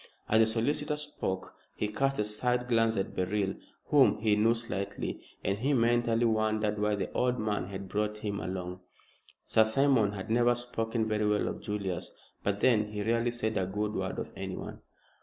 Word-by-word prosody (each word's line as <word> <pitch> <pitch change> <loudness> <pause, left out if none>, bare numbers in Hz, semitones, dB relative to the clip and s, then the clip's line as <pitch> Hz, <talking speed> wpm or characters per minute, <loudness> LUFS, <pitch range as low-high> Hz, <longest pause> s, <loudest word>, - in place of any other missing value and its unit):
As 110 - +4
the 110 - +7
solicitor 145 +7 0
spoke 150 -11 -4 0.2
he 105 - -1
cast 135 +6 0
a 105 - +2
side 125 +4 0
glance 115 -2 +2
at 95 - -2
Beryl, 95 +1 0 0.4
whom - - +5
he 105 -1 +2
knew 110 +3 +4
slightly, 100 -4 -4 0.2
and 100 +1 0
he 140 +5 +1
mentally 120 -1 +3
wondered 110 -1 +1
why 105 0 +2
the 100 - -3
old 125 0 +1
man 105 -4 -1
had 100 0 -6
brought 105 +2 -1
him 105 -1 -3
along. 90 -1 -4 0.7
Sir 110 - +5
Simon 110 -2 +3
had 100 +2 -5
never 120 +1 +4
spoken 115 -2 -2
very 105 -1 +1
well 105 0 +2
of - - -4
Julius, 100 -4 -4 0.3
but 100 0 -1
then 110 -5 +4
he 105 -1 -2
rarely 115 +2 +1
said 115 -2 -2
a 95 -1 0
good 105 +2 -2
word - - -2
of - - -4
anyone. - - -6
110 Hz, 180 wpm, -30 LUFS, 105-120 Hz, 0.7 s, the